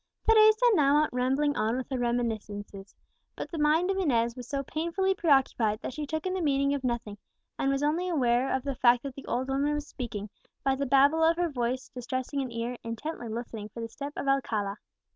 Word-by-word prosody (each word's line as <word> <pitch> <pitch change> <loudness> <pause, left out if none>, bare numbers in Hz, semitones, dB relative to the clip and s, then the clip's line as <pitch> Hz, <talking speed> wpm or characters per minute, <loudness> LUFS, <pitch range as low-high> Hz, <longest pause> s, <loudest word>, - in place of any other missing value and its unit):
Teresa 435 +1 +6
now 285 -6 +4
went 305 - -1
rambling 270 +4 +1
on 220 +3 0
with 260 - -4
her 260 - -1
reminiscences; 215 -5 -3 0.4
but - - -6
the 330 - -4
mind 315 +5 +3
of 385 - -2
Inez 235 -9 +1
was 250 -2 -8
so 275 0 -2
painfully 340 +7 0
preoccupied, 270 - +2
that - - -4
she 300 +1 -5
took 315 +3 -3
in 370 - -1
the 375 - -2
meaning 280 -2 +2
of 280 -2 -3
nothing, 235 -4 -3 0.4
and 270 - +1
was 275 +1 0
only 330 +5 +1
aware 255 -5 +2
of 265 - 0
the 275 - -2
fact 240 -1 +4
that 275 -2 -5
the 275 - -11
old 255 +2 -1
woman 280 +2 0
was 295 0 -3
speaking, 230 -7 -6 0.4
by 270 - +2
the 275 +1 -2
babble 280 +5 +4
of 325 +1 +4
her 350 -1 +1
voice 255 -1 -2
distressing 260 +2 -3
an 260 -2 -4
ear 235 +1 -3
intently 235 +3 -5
listening 220 -2 -6
for 230 - -10
the 230 0 -4
step 280 +5 -7
of - - -4
Alcala. 215 -7 0
270 Hz, 215 wpm, -28 LUFS, 235-300 Hz, 0.4 s, Teresa